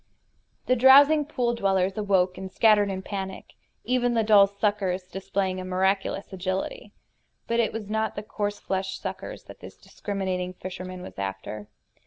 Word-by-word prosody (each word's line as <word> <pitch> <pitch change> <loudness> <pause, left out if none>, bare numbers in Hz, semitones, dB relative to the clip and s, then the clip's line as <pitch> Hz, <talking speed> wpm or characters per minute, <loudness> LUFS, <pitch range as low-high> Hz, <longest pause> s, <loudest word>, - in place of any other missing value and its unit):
The 255 - +3
drowsing 285 +4 +7
pool 245 -5 -1
dwellers 195 -3 +1
awoke 190 -3 +1
and 190 0 -7
scattered 210 -2 +4
in 190 - -3
a - - -6
panic, 190 -1 -6 0.3
even 245 -1 +1
the 225 - +3
dull 205 -2 +6
suckers 200 -2 -1
displaying 190 +1 -3
a - - -5
miraculous 190 +2 -1
agility. 190 - -4 0.5
But 235 0 0
it 230 - +2
was 220 -2 -6
not 220 +1 -1
the 205 - -5
coarse 205 -1 -3
fleshed 190 0 -3
suckers - - -6
that - - -13
this - - -12
discriminating 185 -3 -4
fisherman 185 0 -7
was 180 - -10
after. 100 +2 -5
195 Hz, 160 wpm, -26 LUFS, 185-220 Hz, 0.5 s, drowsing